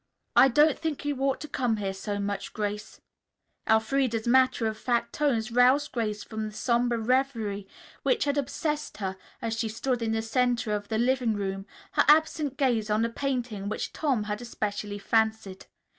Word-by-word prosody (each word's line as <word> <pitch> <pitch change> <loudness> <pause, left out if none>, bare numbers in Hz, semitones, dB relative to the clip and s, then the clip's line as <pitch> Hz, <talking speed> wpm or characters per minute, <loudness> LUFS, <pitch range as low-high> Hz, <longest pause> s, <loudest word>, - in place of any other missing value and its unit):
"I - - +8
don't 295 +3 +4
think 315 -3 -3
you 290 -1 0
ought 270 0 +1
to 300 - -5
come 250 -5 0
here 195 -2 -2
so 205 +1 -4
much, 200 -1 -3
Grace." 210 0 -4 0.7
Elfreda's 225 +1 +2
matter 255 -1 +4
of 220 -1 -1
fact 235 +1 -1
tones 240 -7 0
roused 255 +5 +4
Grace 215 -4 -2
from 220 -1 -4
the 210 - -10
somber 240 +1 +1
reverie 225 -4 0 0.3
which 460 -4 +2
had 285 0 +1
obsessed 300 +2 -2
her 190 -2 -3 0.3
as 225 -1 -1
she 225 -1 0
stood 245 +3 -2
in 225 -1 0
the 225 0 -1
center 240 0 +1
of 205 -1 -3
the 220 - -1
living 245 -1 +1
room, 195 0 -3 0.2
her - - +3
absent 300 -2 +3
gaze 235 -6 +1
on 215 +2 +2
a - - -1
painting 240 -6 -3
which 215 - -4
Tom 270 -9 0
had 210 +2 -4
especially 205 -3 -4
fancied. 220 -2 0
230 Hz, 175 wpm, -27 LUFS, 210-265 Hz, 0.7 s, I